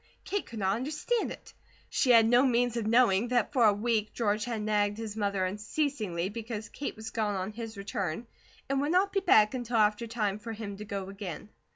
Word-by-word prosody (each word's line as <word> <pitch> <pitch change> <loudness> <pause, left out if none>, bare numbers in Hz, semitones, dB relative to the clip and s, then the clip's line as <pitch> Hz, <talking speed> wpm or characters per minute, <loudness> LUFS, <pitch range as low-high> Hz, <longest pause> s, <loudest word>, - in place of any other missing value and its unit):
Kate 405 0 -3
could 230 - -9
not 195 0 +1
understand 305 - -1
it. - - -11 0.3
She 260 - 0
had 230 -2 +7
no 245 +2 +5
means 245 -2 +2
of 230 -3 -1
knowing 230 -2 +4
that 245 0 +1
for 245 -5 +4
a 210 - +7
week 215 0 -1
George 210 -2 0
had 230 -3 -3
nagged 205 -1 +1
his 220 -2 -5
mother 200 -3 0
unceasingly 210 - -2
because 220 0 -6
Kate 285 - -5
was 220 +1 -7
gone 210 -3 -1
on 190 +2 -3
his 225 -1 -7
return, 195 0 -3 0.4
and 275 0 0
would 290 +2 0
not 380 +3 +3
be 395 - +3
back 215 - +5
until 245 -2 -2
after 215 +2 +2
time 210 -3 -1
for 225 +2 -6
him 210 -2 -6
to 210 - -7
go 200 -3 -4
again. 195 -1 -7
220 Hz, 210 wpm, -29 LUFS, 205-240 Hz, 0.4 s, had